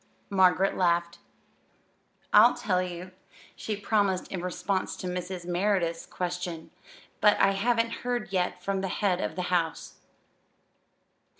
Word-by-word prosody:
Margaret 190 -1 +4
laughed. 170 -1 +1 1.1
"I'll 220 +4 +7
tell 200 -7 0
you," 180 0 -6 0.4
she 215 - -4
promised 200 -2 0
in 185 - -4
response 180 +2 -2
to - - -8
Mrs. 180 0 -4
Merideth's 175 -2 0
question; 180 -2 -4 0.5
"but 210 0 +4
I 195 - +5
haven't 230 +3 +1
heard 245 -5 -3
yet 180 -1 -1
from 195 -1 -1
the 190 - -2
head 190 -1 0
of 160 - -3
the 180 - -2
house." 165 -2 -1
185 Hz, 125 wpm, -28 LUFS, 180-200 Hz, 1.1 s, I'll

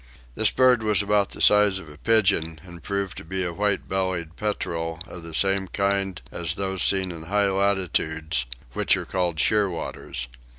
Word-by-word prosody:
This - - +3
bird 130 -2 +4
was 105 -1 +3
about 100 -1 +2
the - - -4
size 105 -2 +5
of 95 - -9
a 75 - -12
pigeon, 90 -4 +2
and 85 -2 -12
proved 100 0 -3
to - - -7
be 95 +3 -2
a 90 -1 -3
white 105 +2 0
bellied 90 -4 -2
petrel 80 -6 -3
of 90 - -9
the 85 0 -9
same 95 +1 +3
kind 100 -1 0
as 85 -2 -2
those 95 -1 -2
seen 95 -2 +2
in 80 -2 -9
high 100 +2 +1
latitudes, 80 -8 0 0.3
which - - +2
are - - -5
called 90 -3 -1
shearwaters. 90 - -1
95 Hz, 175 wpm, -24 LUFS, 85-100 Hz, 0.3 s, size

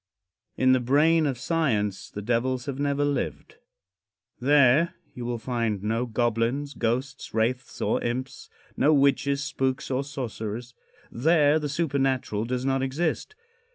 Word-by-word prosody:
In 130 0 +4
the 130 - +4
brain 150 +6 +3
of 135 -3 -2
science 115 - -1
the 105 - -7
devils 125 +2 0
have 140 -1 -4
never 145 0 +1
lived. 145 - -3 0.8
There 140 +4 +4 0.2
you 120 - -6
will 120 0 -2
find 115 -4 -2
no 115 +3 -1
goblins, 120 +5 0
ghosts, 130 +4 -3
wraiths 120 +3 -1
or - - +1
imps 130 +2 -4 0.3
no 155 +1 +4
witches, 140 0 +2
spooks 135 -1 -2
or 130 +1 0
sorcerers. 120 -3 -5 0.4
There 150 +3 +3
the 150 -1 -3
supernatural 135 -8 0
does 125 +1 -2
not 135 0 +1
exist. 155 - -2
130 Hz, 135 wpm, -26 LUFS, 120-145 Hz, 0.8 s, In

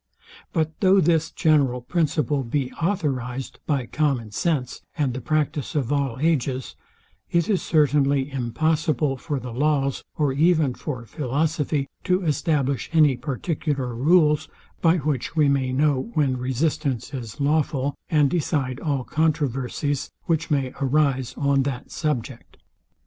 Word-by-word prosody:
But 160 -1 -1
though 195 0 +5
this 165 -2 +2
general 140 -6 +2
principle 145 -1 0
be 130 +2 -2
authorized 135 -8 -2
by 140 -5 0
common 130 -5 -1
sense, 135 0 -1 0.2
and 140 -5 +1
the 130 - -5
practice 150 +3 -1
of 140 -2 0
all 135 -4 0
ages, 135 -4 0 0.5
it 170 -1 +1
is 200 -4 +1
certainly 145 -2 +2
impossible 150 +2 0
for 145 +1 -3
the 125 -2 -7
laws, 140 0 0
or 145 -3 +1
even 155 -2 +3
for 125 -3 -6
philosophy, 145 +1 -1 0.2
to 185 0 +2
establish 140 -4 0
any 155 -5 +5
particular 135 0 -2
rules, 150 +3 +3 0.3
by 165 +1 +4
which 150 0 -2
we 150 -2 +4
may 135 -2 +1
know 140 - +1
when 140 -4 +2
resistance 130 0 -1
is 120 0 -6
lawful; 145 -1 +1
and 150 -5 +3
decide 145 -6 -1
all 140 -4 -1
controversies, 145 -2 -1
which 165 -1 0
may 135 -4 0
arise 135 -2 +1
on 140 -1 +2
that 135 -2 -4
subject. 135 -5 -3
145 Hz, 135 wpm, -24 LUFS, 130-155 Hz, 0.5 s, though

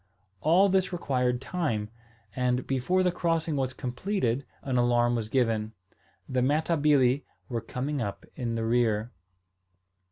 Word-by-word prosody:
All 175 - +5
this 190 -1 +2
required 125 -8 0
time; 130 - -2 0.4
and, 125 0 0
before 135 +8 +1
the 180 - +3
crossing 165 -3 0
was 130 -2 0
completed 125 - -2 0.2
an 130 -2 -1
alarm 120 0 +3
was 115 -3 -2
given. 110 -3 +1 0.5
The 130 -1 0
Matabili 145 -2 +3 0.3
were 115 -2 -2
coming 135 +4 -3
up 100 -3 -4
in 120 -2 -2
the 115 0 -1
rear. 115 -1 +1
125 Hz, 130 wpm, -28 LUFS, 120-155 Hz, 0.5 s, All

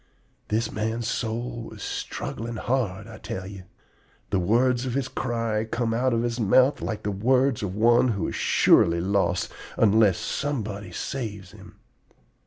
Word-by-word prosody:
This 110 +2 0
man's 110 +2 -2
soul 120 +1 -3
was - - -9
struggling 115 +1 -4
hard, 110 -5 -1
I 110 -1 -11
tell 95 - -5
ye. 95 -1 -9 0.7
The 95 - +2
words 120 +7 +2
of 125 - -2
his 135 -2 0
cry 115 -5 -1
come 115 0 -1
out 125 +3 +1
of 115 0 +1
his 120 0 -2
mouth 125 +6 +4
like 110 -2 -4
the 105 - -1
words 125 +5 +2
of 95 -2 -3
one 120 +3 +4
who 100 -8 -1
is - - -4
surely 85 0 +4
lost 100 +3 0 0.3
unless 105 -3 +4
somebody 105 -9 -3
saves 105 -2 -5
him. - - -14
115 Hz, 155 wpm, -25 LUFS, 100-120 Hz, 0.7 s, mouth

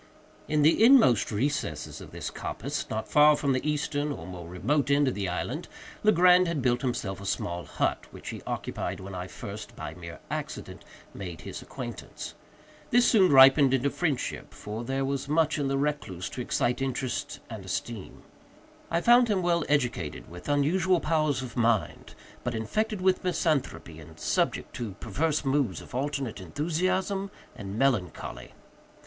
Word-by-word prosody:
In 150 -1 +2
the 160 +8 +5
inmost 230 - +6
recesses 140 +7 -2
of - - -10
this - - -5
coppice, - - -4
not 110 0 -3
far 150 0 +6
from 140 -2 +1
the 130 - 0
eastern 150 -1 -1
or 80 - -6
more 90 -2 -8
remote 130 - 0
end 140 0 +4
of 130 - +1
the 100 -2 -2
island, 90 - -3 0.3
Legrand 180 -3 +6
had 170 -3 -1
built 125 -1 +2
himself 105 -7 -2
a - - -8
small 85 -2 -2
hut, - - -1
which - - -9
he - - -6
occupied - - -3
when 95 +1 -8
I 90 0 -5
first, 100 +3 -8
by 75 - -6
mere 85 0 -9
accident, - - -5 0.3
made 90 -4 -7
his - - -7
acquaintance. - - -7 0.6
This 245 0 +5
soon 190 -7 +5
ripened 135 0 +8
into 135 +2 0
friendship—for 120 -7 -3
there 135 +2 -1
was 140 0 -2
much 155 0 +2
in 140 - 0
the 135 0 0
recluse 140 -11 -2
to 125 - -5
excite 125 +1 0
interest 130 -1 -2
and 110 -4 -7
esteem. 95 +3 -5 0.7
I 170 +1 +1
found 240 +3 +6
him 200 -4 +1
well 170 -1 +2
educated, 125 - -1
with 90 +10 -9
unusual 170 +6 +3
powers 155 -4 +1
of 120 -2 -8
mind, 115 -3 0 0.3
but 120 -1 -2
infected 210 - -1
with 185 0 +2
misanthropy, 150 - -1
and 80 0 -13
subject - - 0
to 115 -5 -4
perverse 155 0 -1
moods 135 - +1
of - - -13
alternate 135 -4 -2
enthusiasm 185 - -1 0.3
and 100 +1 -6
melancholy. 90 - -1
135 Hz, 160 wpm, -28 LUFS, 105-155 Hz, 0.7 s, ripened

